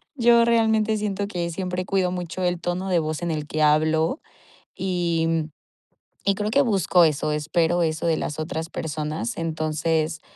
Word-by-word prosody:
yo 235 -3 +5
realmente 220 -2 +2
siento 205 -1 -2
que 175 -4 -3
siempre 180 +1 -3
cuido 185 -2 0
mucho 180 0 -4
el 175 -1 0
tono 180 +2 -2
de 180 -3 +2
voz 155 -1 -3
en 170 - -1
el 150 -1 -3
que 155 - -3
hablo 155 - +2 0.6
y, 175 -3 0
mm, 160 -1 -1 0.8
y 200 - +4
creo 210 +1 -2
que 275 +6 +4
busco 190 - +3
eso, 150 -1 +1
espero 165 +3 +1
eso 160 0 -1
de 160 -1 +2
las 150 - -4
otras 160 +1 -4
personas. 155 +8 -4
Entonces, 155 0 -1
170 Hz, 170 wpm, -24 LUFS, 155-195 Hz, 0.8 s, yo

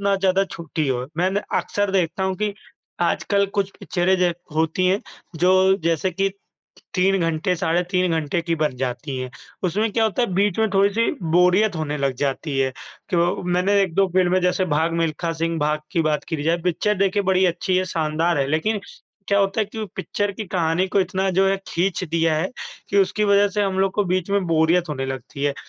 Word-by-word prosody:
ना 200 0 +2
ज़्यादा 195 0 +2
छोटी 165 -4 -4
हो। 125 -1 -1
मैंने 190 +3 +1 0.2
अक्सर 205 -1 -1
देखता 190 -1 0
हूँ 190 - 0
कि 210 -1 -1 0.6
आजकल 200 -1 +1
कुछ 195 -1 +1
पिक्चरें 190 -1 +1
ज 180 -1 +2 0.2
होती 160 +3 +1
हैं, 190 +3 +2 0.4
जो 185 +3 +4
जैसे 170 +2 +1
कि 195 +3 0 0.6
3 195 +1 +3
घंटे, 165 +2 0
साढ़े 165 +2 +1
3 180 -1 +1
घंटे 160 0 0
की 170 0 -1
बन 150 -4 0
जाती 130 +2 -3
हैं। 130 0 -5 0.3
उसमें 210 +5 +1
क्या 225 - +2
होता 220 +3 0
है, 235 - -1
बीच 200 0 +1
में 220 0 +3
थोड़ी-सी 200 +4 +2 0.2
बोरियत 180 +3 +4
होने 150 -2 -2
लग 140 -1 0
जाती 140 +2 -2
है 130 -1 +2 0.4
कि 180 - +1
वो 175 +3 +1
मैंने 180 +3 +1
1-2 195 +1 +2
फ़िल्में 185 0 +3
जैसे 180 +1 +2
भाग 160 +2 +1
मिल्खा 165 +1 -1
सिंह 165 0 -2
भाग 150 0 0
की 165 - +2
बात 155 -1 0
करी 160 -3 -2
जाए, 165 +3 +2
पिक्चर 180 +4 +1
देखिए 200 +1 +2
बड़ी 190 -1 +2
अच्छी 180 +1 0
है, 185 - +2
शानदार 160 -1 0
है, 135 - +1
लेकिन 180 +9 0 0.5
क्या 200 0 +3
होता 195 +2 +1
है - - +2
कि 210 - -9
वो 215 - -3
पिक्चर 205 +1 -2
की 215 - -6
कहानी 175 0 0
को 200 - +2
इतना 190 +1 0
जो 190 +1 +3
है 195 - +2
खींच 180 +1 -1
दिया 165 -1 +1
है 170 +5 -1 0.4
कि 200 - +2
उसकी 205 +2 +2
वज़ह 200 0 +4
से 205 +1 -1
हम 190 -1 -1
लोग 195 0 +2
को 205 - +1
बीच 185 0 -1
में 200 -1 +1
बोरियत 165 +1 +2
होने 135 -3 -3
लगती 135 +1 -5
है। 145 -1 +1
180 Hz, 210 wpm, -22 LUFS, 160-195 Hz, 0.6 s, जो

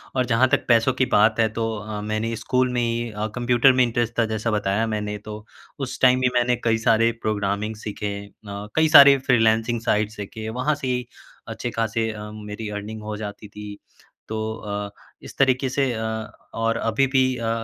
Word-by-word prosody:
और 130 -1 +2
जहाँ 120 +2 +3
तक - - +1
पैसों 115 +2 +4
की 130 0 +1
बात 110 -1 +3
है 115 - +4
तो 115 0 -1
अ, 105 0 -6
मैंने 110 +2 -2
स्कूल 125 +3 0
में 120 - +1
ही 120 0 -1
अ, 105 +1 -3
कंप्यूटर 125 +2 +4
में 130 - +4
इंटरेस्ट 120 0 -1
था 115 - +4
जैसा 110 +1 -1
बताया 105 +1 0
मैंने 105 0 -3
तो, 105 0 -9 0.3
उस 135 -2 -5
टाइम 130 0 +5
भी 125 - +3
मैंने 120 0 +3
कई 115 -1 +2
सारे 115 +1 +4
प्रोग्रामिंग 105 0 -2
सीखे 105 0 -6
है। 100 0 -7
अ, 100 +1 -9
कई 160 0 +4
सारे 140 -3 +9
फ्रीलांसिंग 115 -1 +2
साइट्स 105 -1 0
सीखे, 110 +2 -7
वहाँ 125 +6 0
से 140 -2 -5
ही 125 -1 -1 0.4
अच्छे-खासे 115 0 -2
अ, 105 0 -8
मेरी 105 0 -7
अर्निंग 105 +1 -6
हो 105 0 -5
जाती 105 0 -7
थी। 105 0 -9 0.5
तो 110 - -5 0.2
अ, 105 -1 -5 0.3
इस - - -12
तरीके 130 -1 +2
से 135 0 0
अ, 110 - -4 0.5
और 115 0 0
अभी 115 +4 +1
भी 135 0 +2 0.2
अ, 115 -1 -2
115 Hz, 195 wpm, -23 LUFS, 105-125 Hz, 0.5 s, सारे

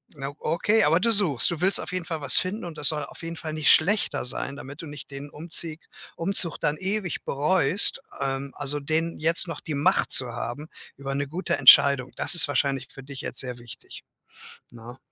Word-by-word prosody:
Na 140 0 -7
okay. 205 +7 +1
Aber 165 +4 +2
du 230 +4 +1
suchst, 170 - +3
du 170 -1 -6
willst 190 +2 +3
auf - - -7
jeden 180 -2 -3
Fall 160 -3 -6
was 140 - +5
finden 185 +2 -2
und 165 -3 -9
das 145 -2 +2
soll 150 -1 -3
auf - - -14
jeden 165 0 -7
Fall 155 -2 -7
nicht 155 -1 +3
schlechter 200 0 +1
sein, 135 +2 -4
damit 140 +2 -10
du - - -9
nicht 145 -2 -11
den 140 +1 -9
Umzieg 160 +1 -3 0.4
Umzug 170 -2 -1
dann 150 - -1
ewig 190 -1 -4
bereust. 170 - +3 0.2
Ähm, 135 0 -4
also, 145 +1 -2
den 160 +3 -2
jetzt 165 +3 +2
noch 165 -3 -7
die 155 - -6
Macht 140 - 0
zu 130 - +6
haben 120 +6 -6 0.3
über 135 0 -6
'ne 140 +1 -2
gute 175 +7 -3
Entscheidung, 140 -3 +5
das - - +4
ist 170 - +6
wahrscheinlich 135 -3 -2
für 135 - -12
dich 135 -1 -10
jetzt 125 - -4
sehr 125 -2 -3
wichtig, 120 -1 -12 0.7
ne? 120 +2 -13
150 Hz, 205 wpm, -24 LUFS, 140-170 Hz, 0.7 s, zu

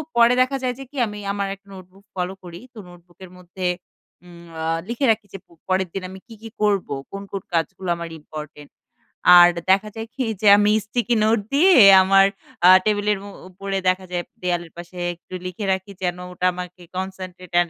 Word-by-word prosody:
পরে 235 +1 +5
দেখা 270 +2 +1
যায় 250 -1 0
যে - - -6
কি? 290 - -13
আমি 210 0 -8
আমার 200 -1 -2
একটা 200 0 -32
নোটবুক 190 +2 -15
ফলো 180 +1 -3
করি। 175 -1 -10
তো - - -18
নোটবুকের 175 +1 -15
মধ্যে 180 +1 -5 0.6
উম 170 -1 -14 0.2
আ - - -3 0.2
লিখে 240 +4 -1
রাখি 220 -1 -2
যে - - -5
প - - -69 0.2
পরের 185 0 +1
দিন 195 - -4
আমি 190 0 -10
কি, 230 - -12
কি 225 - -9
করবো? 200 -8 +1 0.2
কোন, 195 - -6
কোন 195 -2 -4
কাজগুলা 175 +2 -2
আমার 170 0 -6
ইম্পোর্টেন্ট? 150 -1 -10 0.7
আর 175 0 +9 0.2
দেখা 200 +2 +2
যায় 225 0 -6
কি? 265 - -1 0.2
যে 210 - +2
আমি 205 0 +3
স্টিকি 240 +2 -1
নোট 220 0 +3
দিয়ে 360 +6 +5 0.3
আমার 195 +1 +5 0.4
আ - - +9 0.2
টেবলের 210 -1 +1
উ - - -9 0.2
উপরে 195 +1 -4
দেখা 185 +1 -1
যায় 175 -1 -2 0.2
দেওয়ালের 175 -2 -2
পাশে 175 +1 -11 0.2
একটু 175 +2 -17
লিখে 185 +3 -5
রাখি 190 +1 -5
যেন 180 -1 -1
ওটা 180 0 -3
আমাকে 180 0 -8 0.2
concentrate 185 -1 -7
and 175 -1 +1
190 Hz, 195 wpm, -22 LUFS, 180-210 Hz, 0.7 s, আর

